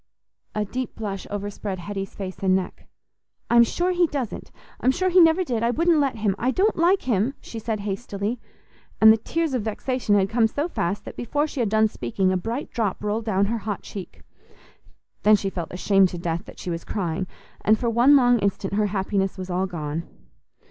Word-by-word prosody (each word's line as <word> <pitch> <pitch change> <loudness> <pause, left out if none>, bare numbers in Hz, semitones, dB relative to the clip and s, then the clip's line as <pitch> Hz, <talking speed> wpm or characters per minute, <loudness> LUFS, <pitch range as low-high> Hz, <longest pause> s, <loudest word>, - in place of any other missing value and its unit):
A 210 0 0
deep 255 +5 -4
blush 200 -3 -5
overspread 205 -1 -4
Hetty's 195 +2 -6
face 190 -2 -6
and 190 -1 +3
neck. 190 -1 -4 0.6
"I'm 235 0 +7
sure 350 +10 0
he 355 -1 +3
doesn't; 270 -7 -4 0.3
I'm 255 - +2
sure 370 +8 +1
he 365 +1 +5
never 330 +2 +5
did; 240 -9 -2
I 235 - +2
wouldn't 330 +5 +3
let 275 -4 +1
him; 210 -3 0
I 250 - +1
don't 395 +10 +2
like 350 +4 +3
him," 235 +2 0
she 230 - -8
said 220 -1 -3
hastily, 205 +2 -3 0.6
and 220 0 +9
the - - +1
tears 320 +6 -2
of 250 - 0
vexation 220 +1 -1
had 195 -1 +3
come 225 +2 +3
so 290 +8 -2
fast 195 - -2
that - - -8
before 290 +5 0
she 300 -3 -6
had 230 -4 +1
done 220 +1 +4
speaking 185 - -1
a - - +1
bright 230 +9 -4
drop 210 -4 -2
rolled 210 +2 -1
down 200 -2 +2
her 230 +3 -1
hot 210 -1 -4
cheek. 195 -3 -9 1.0
Then 215 0 +6
she 195 -1 -2
felt 170 -3 -5
ashamed 195 +1 +3
to 175 - -6
death 170 -1 -3
that - - -13
she 180 - -5
was 165 0 -4
crying, 185 -2 -2 0.4
and 215 +1 +4
for 240 - -2
one 245 +5 +6
long 245 -3 +5
instant 200 -1 -1
her 210 +1 +2
happiness 195 0 -1
was 185 0 -6
all 185 +2 0
gone. 160 -2 -5
215 Hz, 205 wpm, -24 LUFS, 195-250 Hz, 1.0 s, and